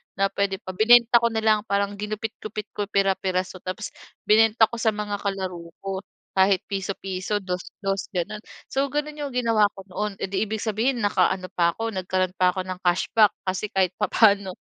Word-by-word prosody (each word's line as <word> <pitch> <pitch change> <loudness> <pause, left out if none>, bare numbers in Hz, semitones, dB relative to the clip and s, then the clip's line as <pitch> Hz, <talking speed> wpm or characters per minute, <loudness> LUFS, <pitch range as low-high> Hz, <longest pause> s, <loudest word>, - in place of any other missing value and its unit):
na 195 +1 +1
puwede 200 -1 0
pa, 185 - -5
binenta 235 +4 +6
ko 235 - +2
na 220 -1 -2
lang 215 -1 +4
parang 200 0 +1
ginupit-gupit 215 0 -5
ko 205 -1 -3
pira-pira 190 -2 +1
tapos 185 +2 -7 0.3
binenta 220 +1 +4
ko 235 - -5
sa 220 -2 +1
mga 205 -1 -3
kalaro 185 -4 -4 0.2
ko 195 -1 -3 0.3
kahit 190 -1 +3
piso-piso, 195 +1 -2
dos 180 -1 -3 0.2
dos 195 0 -1
gano'n. 180 +5 -2 0.3
So, 275 +1 +1
gano'n 295 +2 -3
'yong 285 -2 -4
ginawa 225 -4 +3
ko 195 - -10
noon, 210 +1 -3
eh, - - 0
'di 200 +2 0
ibig 220 0 -3
sabihin 230 +2 0
nakaano 190 -2 +1
pa 170 -1 +1
ako 225 0 -3
nagkaroon 185 -1 -1
pa 180 0 +3
ako 185 - -2
ng 185 -1 -6
cashback 190 +4 +3
kasi 190 +2 -2
kahit 190 -3 +1
papaano 200 -3 +3
200 Hz, 180 wpm, -24 LUFS, 185-220 Hz, 0.3 s, binenta